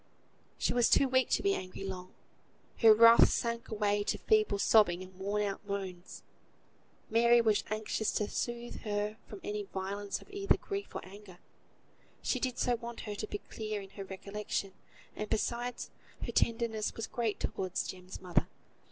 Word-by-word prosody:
She - - +1
was 245 -1 +4
too 275 - +5
weak 260 -1 +2
to - - +1
be 395 0 +3
angry 185 - -5
long; 185 -1 -6 0.6
her 225 -2 +8
wrath 230 +2 +8
sank 235 0 -2
away 205 -1 +1
to - - 0
feeble 430 - +3
sobbing 195 -4 +4
and 185 0 -13
worn 200 +3 -1
out 200 0 -3
moans. 195 -3 -6 0.9
Mary 235 +1 +6
was 220 -3 +4
most - - -17
anxious 215 0 -1
to 210 - 0
soothe 240 +1 -3
her 210 0 -2
from 205 - -9
any 210 0 -2
violence 195 0 -4
of - - -16
either 400 0 +2
grief 400 0 -5
or - - -5
anger; 195 -1 -12 0.9
she 255 - 0
did 255 0 -2
so 245 -1 +1
want 235 0 -7
her 210 - -5
to 215 +1 -4
be 205 - -3
clear 215 -1 -3
in 195 -1 -10
her 195 - -7
recollection; 195 +1 -4 0.4
and, 210 - -4
besides, 240 +3 -2 0.3
her - - -3
tenderness 225 -2 0
was 225 - -3
great 230 -3 -2
towards 185 -1 -2
Jem's 185 0 -8
mother. 180 -2 +1
210 Hz, 170 wpm, -32 LUFS, 195-235 Hz, 0.9 s, her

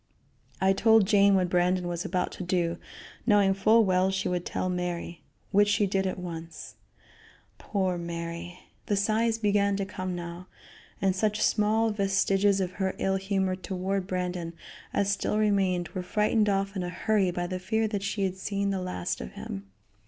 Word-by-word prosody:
I 190 0 +4
told 220 +1 +5
Jane 200 -1 +5
what 185 -1 +2
Brandon 180 0 +2
was 175 0 -3
about 180 0 -1
to - - -6
do, 175 -1 0 0.5
knowing 205 -3 +5
full 220 +3 +4
well 185 0 +3
she 190 0 -1
would 180 -1 -2
tell - - -2
Mary; 175 -2 -3 0.3
which 205 0 +5
she 210 0 +3
did 195 0 0
at 185 - -3
once. 165 -2 -7 0.9
Poor 185 -4 -1
Mary! 170 +1 -6 0.3
The 205 - +1
sighs 220 +3 +1
began 200 -2 +2
to 195 0 -2
come 185 -2 -4
now, 175 +1 -7 0.6
and 190 -1 +3
such 210 +2 0
small 220 +2 +2
vestiges 195 0 +2
of 185 -2 -1
her 190 0 0
ill 195 0 +1
humor 190 -1 0
toward 190 +1 -3
Brandon 180 -2 -3 0.4
as 200 0 +1
still 200 +1 0
remained 195 -5 +1
were 185 - -4
frightened 210 +3 +1
off 195 0 0
in 190 - -2
a 175 - -3
hurry 200 0 +1
by 175 0 -2
the 185 +1 -4
fear 220 +4 0
that 205 -2 -2
she 200 0 -2
had 190 -1 -1
seen 200 +1 -1
the 190 -1 -2
last 180 - -3
of 60 - -8
him. 95 0 -7
190 Hz, 175 wpm, -28 LUFS, 180-200 Hz, 0.9 s, told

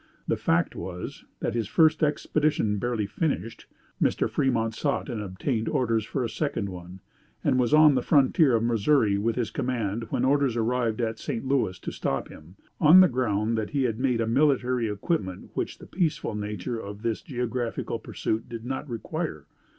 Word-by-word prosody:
The - - +2
fact - - +1
was, 90 -1 -7 0.2
that - - -1
his 115 -3 -1
first 155 +3 +4
expedition 150 -7 +1
barely 120 -3 -1
finished, 115 - -3 0.3
Mr. - - +2
Fremont 115 -4 0
sought 140 +5 -1
and 115 -4 -3
obtained 110 +4 -2
orders 115 -4 +1
for 130 +3 -2
a - - 0
second 115 -5 -2
one, 90 0 -9 0.4
and 130 - +2
was 120 -2 +2
on 155 -1 +7
the 130 - +1
frontier 140 -1 +4
of 115 - +1
Missouri 115 -2 +2
with 115 +2 0
his 120 -3 -2
command 115 -5 -2
when - - 0
orders 140 -3 +2
arrived 115 0 0
at 115 -1 -2
St. 115 +3 -4
Louis 130 -9 +1
to - - -6
stop 70 - -2
him, 80 +4 -14 0.2
on 165 +4 +8
the 185 - +7
ground 115 - 0
that 110 - -3
he 140 -2 0
had 115 -3 -1
made 125 -3 +1
a - - +1
military 125 -2 +2
equipment 100 - -3
which - - -3
the - - -12
peaceful 170 - -1
nature 105 +1 -4
of 100 0 -8
his 115 -2 -1
geographical 125 -2 -3
pursuit 110 +1 -3
did 115 -1 -7
not 135 +3 -4
require! 115 -3 -4
115 Hz, 180 wpm, -26 LUFS, 105-135 Hz, 0.4 s, on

